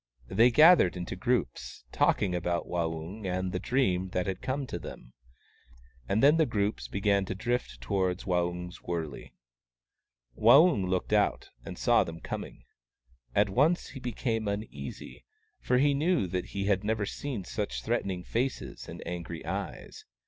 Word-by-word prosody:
They 115 +2 +5
gathered 150 - +6
into 90 0 -5
groups, 60 - -2
talking 95 -3 +2
about 85 -1 -1
Waung 85 +2 -3
and 105 -3 -6
about 95 0 -1
the 90 - -2
dream 95 -9 +1
that 90 - 0
had 95 -1 -3
come 130 +2 -2
to - - -5
them; - - -10 1.0
and 110 +5 +2
then 150 +3 +6
the 160 -2 +3
groups 105 -2 -1
began 100 0 +1
to 95 - -4
drift 110 - -2
towards 90 +6 -1
Waung's 90 -1 -2
wurley. 80 -5 -5 1.0
Waung 125 - +6
looked 95 +3 -1
out, 105 -1 +1
and - - -8
saw - - +4
them 85 0 -8
coming. - - -7 0.7
At 100 0 +4
once 150 - +2
he 135 +2 -9
became 115 -3 -2
uneasy, 70 - -6 0.4
for 125 - +1
he 140 +2 +4
knew 160 - +2
that 90 0 -2
he 100 0 -4
had 100 -1 +1
never 110 0 0
seen 125 -1 -4
such - - -4
threatening 90 +4 -1
faces 125 +7 -3
and - - -8
angry 85 -1 -6
eyes. - - -6
100 Hz, 155 wpm, -29 LUFS, 90-120 Hz, 1.0 s, gathered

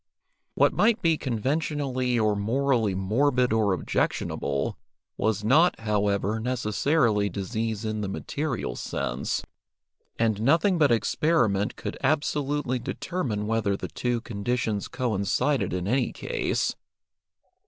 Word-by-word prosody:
What - - +4
might 225 +1 +3
be 165 -1 +4
conventionally 130 -1 -1
or 110 -2 +2
morally 115 -1 +1
morbid 125 +5 +2
or 110 -3 +2
objectionable, 70 -5 -1 0.4
was 110 -2 0
not, 155 +11 +4
however, 105 0 0
necessarily 115 -1 +1
disease 110 +3 -3
in 110 0 -2
the 100 - -2
material 135 +6 -3
sense, - - -3 0.7
and 110 -2 +1
nothing 165 - +3
but 145 -4 +4
experiment 115 -4 +1
could - - -5
absolutely 145 -2 0
determine 120 - -3
whether 105 -3 0
the - - -6
two 120 -1 -1
conditions 110 -1 -2
coincided 115 +1 0
in 90 +1 -2
any 125 +2 +1
case. - - -1
115 Hz, 110 wpm, -26 LUFS, 105-140 Hz, 0.7 s, What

